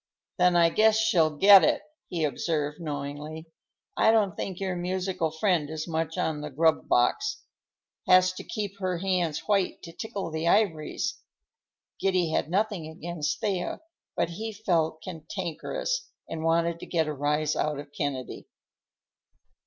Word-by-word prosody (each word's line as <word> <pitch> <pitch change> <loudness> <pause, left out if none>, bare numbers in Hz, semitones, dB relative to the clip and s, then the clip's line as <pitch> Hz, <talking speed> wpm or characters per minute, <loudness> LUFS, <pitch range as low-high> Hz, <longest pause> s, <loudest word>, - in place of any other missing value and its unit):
"Then 180 0 +4
I 170 -1 +6
guess 220 +4 +4
she'll 170 -9 +2
get 195 +3 +9
it," 295 -1 +2 0.2
he 170 -3 -2
observed 150 +1 -1
knowingly. 150 +1 -5 0.5
"I - - +4
don't 215 -4 +3
think 185 -2 -5
your 190 -2 -2
musical 180 -1 -1
friend 160 -2 0
is 155 +1 -4
much 160 -1 -2
on 155 -2 -1
the 150 - -5
grub 160 +3 +2
box. 410 - +1 0.6
Has 185 0 +6
to - - -8
keep 200 -2 -5
her 185 -2 -1
hands 175 -4 0
white 195 +2 0
to 170 - -8
tickle 200 -5 -5
the 160 +1 -2
ivories." 175 - +1 0.8
Giddy 185 -4 +1
had 155 - 0
nothing 200 -3 0
against 160 -1 -4
Thea, 190 -4 -1 0.4
but - - 0
he 220 +6 -5
felt 165 -6 0
cantankerous 185 - -4 0.2
and 160 -1 -5
wanted 170 +1 +1
to - - -9
get 165 -2 +1
a 150 - -2
rise 150 +2 0
out 150 -1 -1
of 145 0 -8
Kennedy. 135 -4 -4
170 Hz, 150 wpm, -27 LUFS, 155-190 Hz, 0.8 s, get